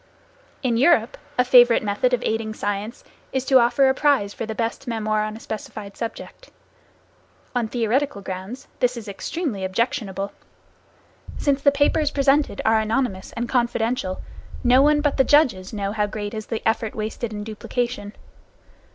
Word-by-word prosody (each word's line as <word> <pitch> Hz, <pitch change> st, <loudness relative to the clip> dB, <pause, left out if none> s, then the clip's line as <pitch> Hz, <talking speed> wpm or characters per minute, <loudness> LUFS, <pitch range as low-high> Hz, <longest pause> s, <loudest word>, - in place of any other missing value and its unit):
In 240 Hz, -3 st, +1 dB
Europe, 255 Hz, -3 st, +4 dB, 0.2 s
a 250 Hz, -, +4 dB
favorite 245 Hz, -2 st, +6 dB
method 210 Hz, +5 st, +1 dB
of 245 Hz, -1 st, 0 dB
aiding 220 Hz, -1 st, -2 dB
science 205 Hz, +3 st, -4 dB, 0.3 s
is 265 Hz, -1 st, -1 dB
to 265 Hz, -1 st, +6 dB
offer 250 Hz, +3 st, +4 dB
a 265 Hz, -, +4 dB
prize 265 Hz, -8 st, +2 dB
for 225 Hz, -, -5 dB
the 220 Hz, -, -4 dB
best 230 Hz, +3 st, -3 dB
memoir 215 Hz, -2 st, 0 dB
on 215 Hz, 0 st, -4 dB
a -, -, -12 dB
specified 210 Hz, -2 st, -7 dB
subject. 235 Hz, -, -7 dB, 1.0 s
On 245 Hz, -3 st, 0 dB
theoretical 240 Hz, +1 st, 0 dB
grounds 190 Hz, +8 st, -7 dB
this 250 Hz, 0 st, +1 dB
is 225 Hz, -2 st, -8 dB
extremely 210 Hz, -, -4 dB
objectionable. 200 Hz, -1 st, -2 dB, 1.1 s
Since 280 Hz, -1 st, +1 dB
the 280 Hz, -, +5 dB
papers 290 Hz, +2 st, +2 dB
presented 280 Hz, -4 st, +2 dB
are 220 Hz, 0 st, +4 dB
anonymous 220 Hz, -3 st, -1 dB
and 235 Hz, +1 st, -3 dB
confidential, 235 Hz, -5 st, -1 dB, 0.4 s
no 250 Hz, +1 st, +6 dB
one 295 Hz, +1 st, +4 dB
but 290 Hz, -1 st, 0 dB
the 265 Hz, -, +5 dB
judges 250 Hz, -12 st, +3 dB
know 200 Hz, -2 st, -3 dB
how 210 Hz, -1 st, 0 dB
great 205 Hz, 0 st, -5 dB
is 215 Hz, -1 st, -6 dB
the 225 Hz, -, -3 dB
effort 225 Hz, -1 st, 0 dB
wasted 220 Hz, +1 st, -4 dB
in 210 Hz, -1 st, -5 dB
duplication. 220 Hz, 0 st, -4 dB
230 Hz, 160 wpm, -23 LUFS, 215-260 Hz, 1.1 s, favorite